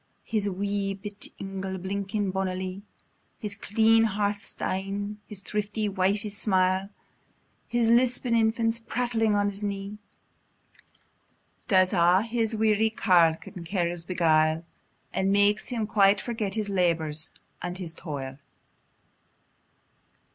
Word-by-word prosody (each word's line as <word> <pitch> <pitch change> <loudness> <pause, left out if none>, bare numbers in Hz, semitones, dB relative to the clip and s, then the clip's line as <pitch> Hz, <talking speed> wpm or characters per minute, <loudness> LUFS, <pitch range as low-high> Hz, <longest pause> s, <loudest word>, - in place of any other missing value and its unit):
His 210 -2 0
wee 200 +1 -2
bit 205 +1 -6
ingle, 195 -1 -4
blinkin 200 +2 -2
bonilie, 185 0 -3 0.6
His 210 -4 -5
clean 225 +2 +3
hearth 205 0 -1
stane, 200 +2 -3
his 205 -2 -8
thrifty 210 +1 -2
wifie's 200 +2 0
smile, 190 -1 +1 0.8
The 240 0 +1
lisping 240 +1 +3
infant, 225 0 +1
prattling 225 -3 +1
on 205 0 +2
his 200 +1 -5
knee, 200 0 -4 1.7
Does 185 -3 +4
a' 180 +2 +4
his 230 -1 -1
weary 220 0 +3
kiaugh 175 -7 +4 0.2
and 180 - -6
care 175 -1 -1
beguile, 160 -2 +2 0.5
And 190 +1 +1
makes 205 +1 +3
him 230 -3 -2
quite 205 -2 +4
forget 220 -4 -3
his 215 -2 -1
labour 170 -5 +1 0.5
and 175 +1 -4
his 175 -3 -6
toil. 135 -5 -6
200 Hz, 115 wpm, -27 LUFS, 185-215 Hz, 1.7 s, Does